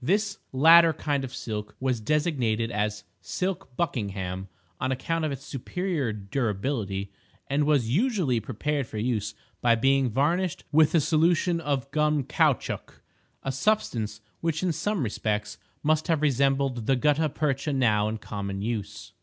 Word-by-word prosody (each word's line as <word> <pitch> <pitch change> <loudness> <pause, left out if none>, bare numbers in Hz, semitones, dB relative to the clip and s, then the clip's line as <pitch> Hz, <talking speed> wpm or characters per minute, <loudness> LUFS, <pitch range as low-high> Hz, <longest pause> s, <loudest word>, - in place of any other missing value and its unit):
This 200 - +1
latter 165 +4 +7
kind 145 -3 -1
of 130 - -5
silk 105 -4 -5
was 130 -2 0
designated 120 -5 0
as 105 -1 -1 0.2
silk 180 -8 -4
buckingham, 100 - -2 0.3
on 130 - -1
account 160 +5 -1
of 155 - -1
its 135 0 -6
superior 155 - -2
durability, 100 -1 -2 0.3
and 145 +2 +1
was 145 -6 +3
usually 180 - +2
prepared 130 +5 -2
for 110 - -7
use 105 -2 -1 0.3
by 120 -1 +4
being 135 +2 +3
varnished 160 - 0
with 155 +2 +4
a - - +6
solution 165 +3 +2
of 140 -3 -2
gum 150 -1 +2
caoutchouc—a 145 -2 -2
substance 125 - 0 0.2
which 165 0 -1
in 180 - +2
some 175 +2 -1
respects 105 -2 -2 0.2
must 155 +1 +2
have 160 -3 +1
resembled 135 -3 +1
the 135 - +4
gutta 150 +4 +2
percha 145 0 -1
now 110 -6 +2
in 110 - -3
common 100 -2 -5
use. 110 -3 -4
135 Hz, 145 wpm, -27 LUFS, 110-155 Hz, 0.3 s, latter